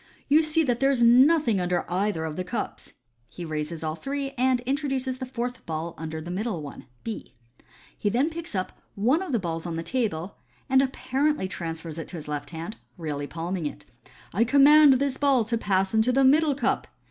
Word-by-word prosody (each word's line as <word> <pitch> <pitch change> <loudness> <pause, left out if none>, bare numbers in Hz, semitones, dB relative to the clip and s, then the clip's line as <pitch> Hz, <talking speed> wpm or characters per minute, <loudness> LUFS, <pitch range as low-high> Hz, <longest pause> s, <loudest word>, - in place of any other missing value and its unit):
u 290 - +6
You - - +6
see 320 +1 +2
that 245 -5 0
there 270 - +3
is 255 -4 +2
nothing 250 - +5
under 180 0 0
either 180 -2 -1
of 155 -1 -4
the 185 - -2
cups." 180 +6 -5 0.4
He 175 - -8
raises 155 +1 -4
all 155 -1 -1
three, 275 - -4
and 255 -1 +2
introduces 265 -1 -2
the 260 - -4
fourth 245 0 -4
ball 160 +1 -3
under 160 0 -5
the 170 +3 -7
middle 190 -3 -3
one 140 - -10 0.2
(B). 225 - -6 0.6
He 205 - -1
then 260 +9 +1
picks 335 -7 -6
up 185 -1 -4
one 250 - +2
of 375 -5 -4
the 240 - +2
balls 170 -3 -3
on 170 - -3
the 165 - -3
table, 200 -7 -2 0.3
and 265 -1 +5
apparently 270 -2 0
transfers 165 -3 -5
it 165 - -6
to - - -9
his 155 -3 -7
left 145 -1 -4
hand, 170 +7 -6 0.2
really 145 -4 -4
palming 170 +1 -3
it. - - -9 0.3
" - - -24
I 210 +6 +3
command 285 +3 +7
this 270 +1 0
ball 275 -4 +3
to 225 +2 -1
pass 195 -3 0
into 220 +3 +3
the 270 +2 +3
middle 290 +2 +4
cup. 260 - 0
225 Hz, 205 wpm, -26 LUFS, 170-270 Hz, 0.6 s, command